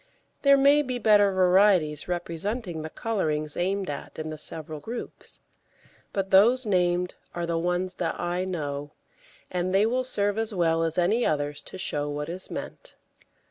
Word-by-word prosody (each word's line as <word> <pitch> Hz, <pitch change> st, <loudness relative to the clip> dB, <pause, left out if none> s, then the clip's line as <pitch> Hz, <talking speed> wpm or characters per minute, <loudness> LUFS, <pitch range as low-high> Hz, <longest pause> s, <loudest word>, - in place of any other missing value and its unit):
There 280 Hz, -1 st, +6 dB
may 280 Hz, +2 st, +5 dB
be 255 Hz, -3 st, -3 dB
better 205 Hz, -3 st, +4 dB
varieties 185 Hz, -5 st, +3 dB
representing 175 Hz, +2 st, -3 dB
the 160 Hz, -, -6 dB
colourings 155 Hz, -9 st, -2 dB
aimed 190 Hz, +2 st, -1 dB
at 145 Hz, -, -6 dB
in 155 Hz, 0 st, -4 dB
the 155 Hz, -, -6 dB
several 155 Hz, 0 st, -4 dB
groups, 230 Hz, +10 st, -8 dB, 0.7 s
but 195 Hz, -1 st, -3 dB
those 235 Hz, +7 st, +5 dB
named 180 Hz, -2 st, +1 dB, 0.2 s
are 175 Hz, 0 st, -2 dB
ones 180 Hz, +2 st, -1 dB
that -, -, -2 dB
I 175 Hz, +1 st, -1 dB
know, 145 Hz, -5 st, -4 dB, 0.6 s
and 185 Hz, +1 st, -1 dB
they 200 Hz, +2 st, +5 dB
will 250 Hz, +3 st, 0 dB
serve 205 Hz, -4 st, 0 dB
as 225 Hz, -2 st, -2 dB
well 165 Hz, -2 st, +2 dB
as 165 Hz, -1 st, 0 dB
any 205 Hz, +7 st, +2 dB
others 145 Hz, -3 st, -1 dB
to -, -, -8 dB
show 145 Hz, -5 st, -2 dB
what 150 Hz, +1 st, -4 dB
is 180 Hz, +2 st, -3 dB
meant. -, -, -8 dB
180 Hz, 160 wpm, -26 LUFS, 160-205 Hz, 0.7 s, There